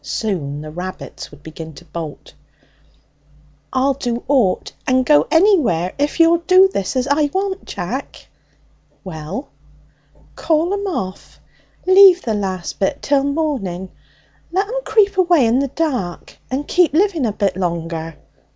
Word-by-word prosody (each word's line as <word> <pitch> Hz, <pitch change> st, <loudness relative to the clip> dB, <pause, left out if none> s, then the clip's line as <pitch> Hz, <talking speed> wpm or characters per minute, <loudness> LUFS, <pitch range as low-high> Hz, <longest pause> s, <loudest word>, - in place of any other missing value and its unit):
Soon 145 Hz, -2 st, -3 dB
the 155 Hz, 0 st, -8 dB
rabbits 180 Hz, +3 st, -7 dB
would 145 Hz, 0 st, -17 dB
begin 160 Hz, 0 st, -9 dB
to 175 Hz, -, -14 dB
bolt. 160 Hz, -2 st, -8 dB, 1.4 s
'I'll 270 Hz, +2 st, +2 dB
do 245 Hz, -3 st, -3 dB
ought 250 Hz, -10 st, +1 dB, 0.2 s
and 255 Hz, 0 st, +2 dB
go 295 Hz, +1 st, +4 dB
anywhere 310 Hz, -, +3 dB
if 290 Hz, +3 st, -1 dB
you'll 330 Hz, +1 st, +5 dB
do 370 Hz, +3 st, +5 dB
this 195 Hz, +4 st, -2 dB
as 255 Hz, 0 st, 0 dB
I 290 Hz, +2 st, +2 dB
want, 385 Hz, +1 st, -2 dB
Jack.' -, -, -6 dB, 0.8 s
'Well?' 155 Hz, -6 st, -6 dB, 0.9 s
'Call 330 Hz, +3 st, +1 dB
'em 405 Hz, 0 st, -2 dB
off! 190 Hz, -, -5 dB, 0.5 s
Leave 375 Hz, -1 st, +7 dB
the 225 Hz, -, -1 dB
last 190 Hz, -4 st, -3 dB
bit 195 Hz, -, -1 dB
till 280 Hz, -1 st, +2 dB
morning. 270 Hz, -, -2 dB, 0.6 s
Let 385 Hz, +3 st, 0 dB
'em -, -, -2 dB
creep 405 Hz, -3 st, +2 dB
away 345 Hz, -7 st, +4 dB
in 230 Hz, +3 st, +3 dB
the 280 Hz, -, 0 dB
dark 255 Hz, -, -3 dB
and 275 Hz, +3 st, -3 dB
keep 355 Hz, -4 st, +3 dB
living 335 Hz, -, +2 dB
a -, -, 0 dB
bit 200 Hz, -2 st, -1 dB
longer!' 165 Hz, -3 st, -3 dB
255 Hz, 140 wpm, -19 LUFS, -, 1.4 s, Leave